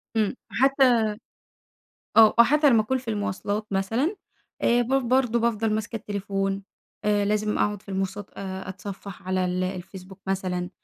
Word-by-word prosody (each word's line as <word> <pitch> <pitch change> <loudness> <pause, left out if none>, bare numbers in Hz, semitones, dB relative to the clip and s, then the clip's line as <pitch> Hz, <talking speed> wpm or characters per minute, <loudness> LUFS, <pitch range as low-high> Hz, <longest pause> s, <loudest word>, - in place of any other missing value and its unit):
إمم. 215 +2 +1
حتى 265 -2 +4 1.2
آه، 220 -1 +8
حتى 290 +4 +5
لمّا 225 -2 +5
أكون 260 +5 0
في 245 -2 -11
المواصلات 205 0 -2
مثلًا، 225 - 0 0.5
آآ 240 +1 +4
باف 265 +3 +1
برضه 245 -1 +2
بافضل 225 -2 +1
ماسكة 220 +1 -2
التليفون، 195 -2 -2 0.4
آآ 205 -1 +2
لازم 210 +1 0
أقعد 210 -1 0
في - - -29
المواصلات 195 +1 -3
أتصفح 190 0 -7
على 185 0 0
ال 180 0 -1
الفيسبوك 185 +1 -7
مثلًا، 185 -2 -2
205 Hz, 140 wpm, -25 LUFS, 195-235 Hz, 1.2 s, آه